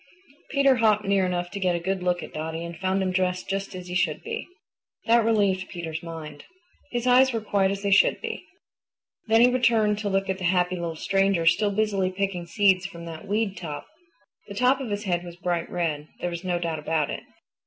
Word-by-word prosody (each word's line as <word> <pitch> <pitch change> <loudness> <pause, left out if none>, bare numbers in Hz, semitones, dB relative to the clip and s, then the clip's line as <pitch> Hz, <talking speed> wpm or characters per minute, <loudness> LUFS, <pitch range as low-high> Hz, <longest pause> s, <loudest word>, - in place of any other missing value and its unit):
Peter 275 -2 +4
hopped 215 -2 +3
near 195 -1 +2
enough 175 -1 -2
to 200 - -5
get 180 -2 +1
a - - -1
good 190 +2 -2
look 180 -1 0
at - - -10
Dotty 160 +2 -4
and 170 0 -7
found 190 +2 0
him 185 - 0
dressed 185 0 0
just 195 -1 -3
as 180 -1 -7
he 180 - -6
should 180 - 0
be. - - -5 0.6
That 230 0 +5
relieved 200 -4 +1
Peter's 165 -3 -5
mind. 160 -3 -8 0.5
His 240 -1 -2
eyes 255 +1 +5
were 230 - -1
quite 200 -3 +1
as 200 +1 -3
they 200 - 0
should 200 - +5
be. - - -5 0.8
Then 225 +1 +5
he 250 +1 +6
returned 225 -4 +3
to 210 -1 -2
look 195 0 0
at 190 0 -2
the - - -6
happy 180 0 +2
little 170 -2 -4
stranger 195 0 +1
still 205 +5 +4
busily 200 -2 0
picking 185 -2 -2
seeds 190 0 +3
from 170 -3 -10
that 165 +4 -8
weed 205 -1 0
top. 160 -5 -6 0.6
The 200 - -8
top 255 +5 +3
of 255 - -4
his 205 0 -3
head 175 -4 -1
was 175 -1 -9
bright 175 -1 -2
red. 155 -4 -2
There 175 - -2
was 170 +1 -5
no 180 -1 0
doubt 165 -2 -2
about 155 -1 0
it. - - -5
190 Hz, 215 wpm, -25 LUFS, 175-205 Hz, 0.8 s, he